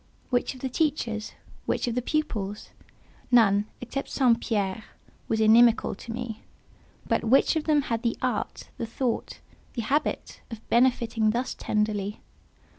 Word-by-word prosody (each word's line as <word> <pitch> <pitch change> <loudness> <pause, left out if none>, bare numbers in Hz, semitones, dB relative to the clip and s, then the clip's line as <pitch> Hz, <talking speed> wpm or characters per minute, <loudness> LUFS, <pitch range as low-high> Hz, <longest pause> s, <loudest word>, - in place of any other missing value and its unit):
Which 245 +2 0
of 255 - -13
the 265 - -1
teachers? 245 -7 -1 0.3
Which - - 0
of 240 - 0
the 250 - 0
pupils? 215 -8 -2 0.6
None, 210 -4 +4
except 260 +3 -4
St. 245 -4 +3
Pierre, 205 -2 -1 0.4
was 220 - 0
inimical 225 +2 +5
to 220 +3 -9
me; 230 -2 -5 0.7
but - - +1
which 265 +7 +4
of 315 - -1
them 300 -2 +3
had 230 -3 -2
the 235 -2 -1
art, 250 -5 -3
the 230 - -2
thought, 235 +1 -3 0.3
the 235 - -3
habit, 290 +7 -1
of 230 -2 -10
benefiting 235 -3 +3
thus 240 +4 -1
tenderly? 210 -1 -1
235 Hz, 145 wpm, -26 LUFS, 215-255 Hz, 0.7 s, inimical